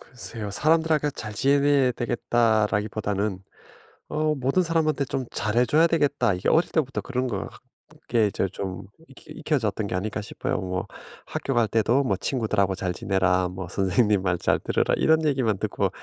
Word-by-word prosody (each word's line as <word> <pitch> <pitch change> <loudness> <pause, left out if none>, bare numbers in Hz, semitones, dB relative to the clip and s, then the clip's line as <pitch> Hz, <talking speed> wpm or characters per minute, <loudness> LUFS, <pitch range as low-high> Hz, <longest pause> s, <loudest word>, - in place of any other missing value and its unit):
글쎄요. 115 -4 -7
'사람들하고 155 +4 +2
잘 105 -5 -7
지내야 140 +1 +3
되겠다.'라기보다는 110 -4 0 0.7
어 155 0 0
'모든 135 +7 +1
사람한테 160 -4 +1
좀 130 -1 -3
잘해 120 +4 +1
줘야 155 +7 +4
되겠다.' 145 - +1
이게 90 - -3
어릴 165 - +3
때부터 135 -5 -1
그런 130 -1 -2
걸 105 -6 -3
학 - - -16 0.5
이게 115 -3 +3
이제 95 - -1
좀 95 -1 -5 0.3
익히 135 - -16
익혀졌던 120 - -1
게 100 - -5
아닐까 105 +4 -2
싶어요. 130 +5 -3
뭐 95 -1 -3 0.4
학교 135 - -3
갈 120 -1 +3
때도 115 +5 +2
뭐 100 -6 0
"친구들하고 105 -6 0
잘 90 -1 -2
지내라. 95 -1 +1
뭐 90 0 -6
선생님 100 +2 +2
말 90 -2 +1
잘 - - +1
들어라." - - 0
이런 160 0 +3
얘기만 125 -8 +1
듣고 - - -1
115 Hz, 360 characters per minute, -25 LUFS, 100-140 Hz, 0.7 s, 줘야